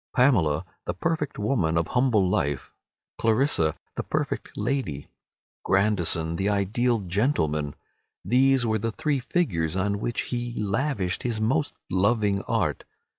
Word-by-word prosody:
Pamela, 95 Hz, -, +3 dB, 0.2 s
the 90 Hz, -, -2 dB
perfect 155 Hz, -, -2 dB
woman 105 Hz, -7 st, +1 dB
of 85 Hz, -, 0 dB
humble 125 Hz, -7 st, +3 dB
life, 70 Hz, -6 st, -1 dB, 0.5 s
Clarissa, 110 Hz, -, +2 dB, 0.2 s
the -, -, -1 dB
perfect -, -, -2 dB
lady, 120 Hz, -, -2 dB, 0.5 s
Grandison 85 Hz, -5 st, +2 dB
the 95 Hz, +3 st, 0 dB
ideal 110 Hz, +4 st, +1 dB
gentleman—these 105 Hz, -, 0 dB
were 110 Hz, -1 st, +1 dB
the 115 Hz, +2 st, -2 dB
three 145 Hz, +2 st, 0 dB
figures 95 Hz, -, 0 dB
on 100 Hz, +1 st, 0 dB
which 120 Hz, +2 st, -1 dB
he 120 Hz, -1 st, -4 dB
lavished 105 Hz, -2 st, -1 dB
his 115 Hz, -3 st, -2 dB
most 140 Hz, +7 st, 0 dB, 0.2 s
loving 100 Hz, +1 st, +2 dB
art. -, -, 0 dB
105 Hz, 125 wpm, -26 LUFS, 90-125 Hz, 0.5 s, Pamela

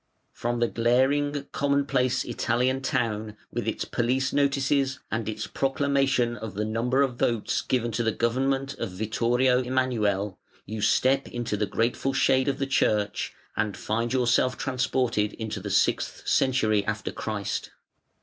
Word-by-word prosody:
From 120 Hz, 0 st, -2 dB
the 120 Hz, -, +3 dB
glaring, 135 Hz, +5 st, +1 dB
commonplace 140 Hz, -3 st, +1 dB
Italian 125 Hz, +3 st, 0 dB
town 110 Hz, -5 st, -1 dB
with -, -, -3 dB
its -, -, -2 dB
police 130 Hz, +2 st, 0 dB
notices 140 Hz, -1 st, +1 dB
and 110 Hz, -1 st, -2 dB
its 110 Hz, +1 st, -4 dB
proclamation 135 Hz, -3 st, +1 dB
of 110 Hz, -2 st, -7 dB
the 105 Hz, +1 st, -1 dB
number 120 Hz, +5 st, +1 dB
of 125 Hz, -3 st, -2 dB
votes 115 Hz, -3 st, +1 dB
given 120 Hz, -2 st, 0 dB
to 115 Hz, +2 st, -1 dB
the 115 Hz, -1 st, +1 dB
government 135 Hz, +4 st, 0 dB
of -, -, -2 dB
Vittorio 120 Hz, +6 st, +1 dB
Emmanuele, 110 Hz, -7 st, 0 dB, 0.3 s
you 110 Hz, +1 st, -5 dB
step 135 Hz, +5 st, +3 dB
into 120 Hz, -3 st, -3 dB
the 105 Hz, 0 st, -1 dB
grateful 120 Hz, +6 st, 0 dB
shade 130 Hz, 0 st, +3 dB
of 135 Hz, -1 st, 0 dB
the 135 Hz, -, -1 dB
church 105 Hz, -6 st, 0 dB, 0.2 s
and 105 Hz, -2 st, -1 dB
find 115 Hz, +2 st, -1 dB
yourself 125 Hz, 0 st, +2 dB
transported 125 Hz, -5 st, 0 dB
into 110 Hz, -2 st, -5 dB
the -, -, -6 dB
sixth -, -, 0 dB
century 110 Hz, -6 st, +2 dB
after 110 Hz, 0 st, -2 dB
Christ. 105 Hz, -3 st, -3 dB
120 Hz, 145 wpm, -26 LUFS, 110-135 Hz, 0.3 s, the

